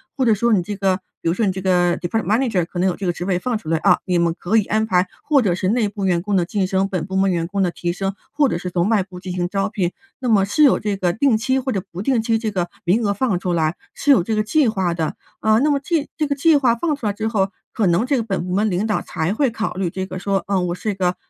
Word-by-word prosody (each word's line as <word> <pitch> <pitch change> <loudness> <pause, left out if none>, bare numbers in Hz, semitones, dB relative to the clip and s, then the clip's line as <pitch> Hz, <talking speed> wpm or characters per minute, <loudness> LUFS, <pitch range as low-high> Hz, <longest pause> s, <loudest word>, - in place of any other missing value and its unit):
或 265 - 0
者 225 - +5
说 235 +2 +2
你 185 - +3
这 205 +4 -5
个 190 -2 +2 0.3
比 - - -3
如 165 - +3
说 220 - -1
你 190 - +2
这 190 - -5
个 175 -2 +2
department 220 +6 -2
manager 215 -2 +1
可 175 - -9
能 185 +2 +2
有 180 - 0
这 195 - -5
个 - - +3
职 175 +1 -6
位 180 -2 0
放 240 +2 -1
出 165 - -13
来 165 0 +1
啊， - - +4
你 180 -2 +1
们 170 -1 +1
可 220 +6 +1
以 210 - +2
安 220 +1 +1
排 180 -3 +2 0.2
或 290 -3 +3
者 185 -7 +1
是 185 - -2
内 220 -1 +1
部 200 -2 -4
员 175 -2 +2
工 205 +1 -1
的 175 -2 +2
晋 195 -1 -1
升、 190 +1 +1
本 180 -5 -3
部 190 - -5
门 190 0 +3
员 170 -1 -1
工 195 +2 -1
的 180 - +1
提 175 0 -3
升， 195 +2 -3 0.2
或 290 -1 +2
者 170 - -1
是 180 - -4
从 175 +1 0
外 215 -4 +3
部 180 -1 -9
进 180 -1 -6
行 175 -1 -1
招 195 0 0
聘， 195 -5 -1 0.3
那 250 -2 -2
么 200 -3 +4
是 205 +10 +2
有 280 - +5
这 205 -2 -2
个 180 -2 +1
定 245 +2 +2
期 260 +4 0
或 260 0 -2
者 195 -4 -1
不 180 +3 -5
定 245 -2 +2
期 225 0 +1
这 220 -1 -3
个 175 -3 -2
名 195 +7 +2
额 205 - +1
放 200 -4 0
出 180 -1 -2
来 160 0 +1 0.2
是 290 - +2
有 210 - +6
这 220 +2 -1
个 215 - +1
计 285 +4 +2
划 190 -5 0
的。 160 -2 -2 0.2
啊， 220 0 +3
那 295 +2 +2
么 280 - +1
这 320 -3 0
这 305 -2 -1
个 280 - -1
计 315 +2 +4
划 250 -4 +3
放 300 +5 -1
出 235 -7 -4
来 205 - 0
之 220 +2 -3
后， 195 -4 +1 0.2
可 215 -6 +1
能 175 +8 +2
这 275 0 +1
个 - - +1
本 195 -5 -2
部 180 - -3
门 210 +3 +2
领 190 +3 0
导 215 - 0
才 170 +3 -2
会 270 +2 +2
考 220 -2 -3
虑 185 -2 -2
这 190 +2 -4
个 185 0 -6
说， 195 0 -1
呃， 195 -2 +1
我 175 -1 -2
是 215 +3 -2
一 - - -3
个 180 -1 0
195 Hz, 380 characters per minute, -20 LUFS, 180-225 Hz, 0.3 s, 有